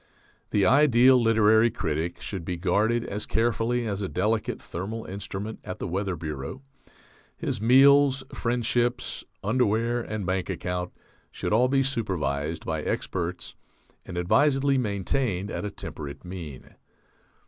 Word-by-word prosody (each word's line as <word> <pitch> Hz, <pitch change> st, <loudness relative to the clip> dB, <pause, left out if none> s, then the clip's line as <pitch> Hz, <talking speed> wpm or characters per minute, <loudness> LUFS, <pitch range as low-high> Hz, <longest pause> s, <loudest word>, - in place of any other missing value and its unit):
The 100 Hz, -2 st, +2 dB
ideal 130 Hz, 0 st, +6 dB
literary 110 Hz, 0 st, +5 dB
critic 80 Hz, -3 st, -3 dB
should 95 Hz, -4 st, -5 dB
be 90 Hz, +1 st, -3 dB
guarded 105 Hz, +7 st, +1 dB
as 105 Hz, +1 st, -4 dB
carefully 120 Hz, +1 st, 0 dB
as 100 Hz, -2 st, -2 dB
a 95 Hz, -, -2 dB
delicate 110 Hz, +4 st, -1 dB
thermal 105 Hz, +6 st, -6 dB
instrument 100 Hz, +2 st, -6 dB
at 90 Hz, -, -6 dB
the -, -, -4 dB
Weather 95 Hz, +1 st, -2 dB
Bureau; 75 Hz, -, -6 dB, 0.7 s
his -, -, -3 dB
meals, 135 Hz, +3 st, +6 dB
friendships, 120 Hz, +1 st, 0 dB, 0.2 s
underwear, 115 Hz, +2 st, +1 dB
and 110 Hz, -3 st, -4 dB
bank 95 Hz, +1 st, -1 dB
account 90 Hz, 0 st, -3 dB, 0.4 s
should -, -, -3 dB
all 120 Hz, +4 st, +4 dB
be 135 Hz, +1 st, +2 dB
supervised 85 Hz, -, -2 dB
by 80 Hz, -1 st, -2 dB
experts 90 Hz, +3 st, -3 dB, 0.5 s
and 90 Hz, -, -7 dB
advisedly 135 Hz, +9 st, +3 dB
maintained 100 Hz, -1 st, -1 dB
at -, -, -4 dB
a -, -, -2 dB
temperate 75 Hz, -5 st, -8 dB
mean. 85 Hz, -7 st, -8 dB
105 Hz, 130 wpm, -26 LUFS, 90-120 Hz, 0.7 s, ideal